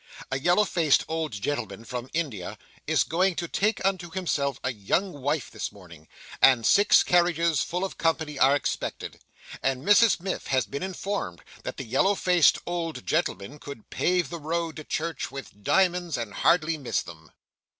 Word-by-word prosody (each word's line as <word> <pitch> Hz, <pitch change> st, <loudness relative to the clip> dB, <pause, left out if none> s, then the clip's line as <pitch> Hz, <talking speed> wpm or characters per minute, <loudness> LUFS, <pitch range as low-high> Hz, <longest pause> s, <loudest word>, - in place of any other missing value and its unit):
A 135 Hz, -, 0 dB
yellow 175 Hz, +8 st, +4 dB
faced 165 Hz, -6 st, +2 dB
old 160 Hz, -2 st, -2 dB
gentleman 110 Hz, -1 st, -4 dB
from 125 Hz, 0 st, -6 dB
India, 135 Hz, -, -3 dB, 0.3 s
is -, -, +3 dB
going 180 Hz, +2 st, +1 dB
to 170 Hz, -, -3 dB
take 210 Hz, +4 st, 0 dB
unto 185 Hz, -3 st, 0 dB
himself 155 Hz, -7 st, -1 dB
a 130 Hz, -, -1 dB
young 145 Hz, -, -1 dB
wife 145 Hz, -1 st, -1 dB
this -, -, -4 dB
morning, 85 Hz, -5 st, -15 dB, 0.3 s
and 125 Hz, -4 st, +6 dB
six 205 Hz, +1 st, +6 dB
carriages 170 Hz, -2 st, +2 dB
full 180 Hz, +2 st, -2 dB
of 195 Hz, -, -8 dB
company 160 Hz, -3 st, 0 dB
are 135 Hz, +2 st, +5 dB
expected, 145 Hz, -, -4 dB, 0.4 s
and 135 Hz, 0 st, -1 dB
Mrs 205 Hz, -1 st, +5 dB
Miff 190 Hz, +2 st, -4 dB
has 130 Hz, -1 st, +1 dB
been 140 Hz, -, -6 dB
informed 190 Hz, -, -4 dB, 0.2 s
that -, -, -6 dB
the -, -, -4 dB
yellow 135 Hz, -, +2 dB
faced 180 Hz, -4 st, +4 dB
old 170 Hz, -2 st, -4 dB
gentleman 150 Hz, -, -2 dB
could 140 Hz, -7 st, -10 dB
pave 180 Hz, -5 st, +1 dB
the 170 Hz, -, -5 dB
road 165 Hz, +1 st, -3 dB
to 155 Hz, -, -7 dB
church 160 Hz, -1 st, -3 dB
with 135 Hz, -7 st, -10 dB
diamonds 180 Hz, -, +2 dB
and 115 Hz, -3 st, -5 dB
hardly 165 Hz, -2 st, +2 dB
miss 135 Hz, -, -1 dB
them. 80 Hz, -2 st, -13 dB
160 Hz, 170 wpm, -26 LUFS, 130-175 Hz, 0.4 s, and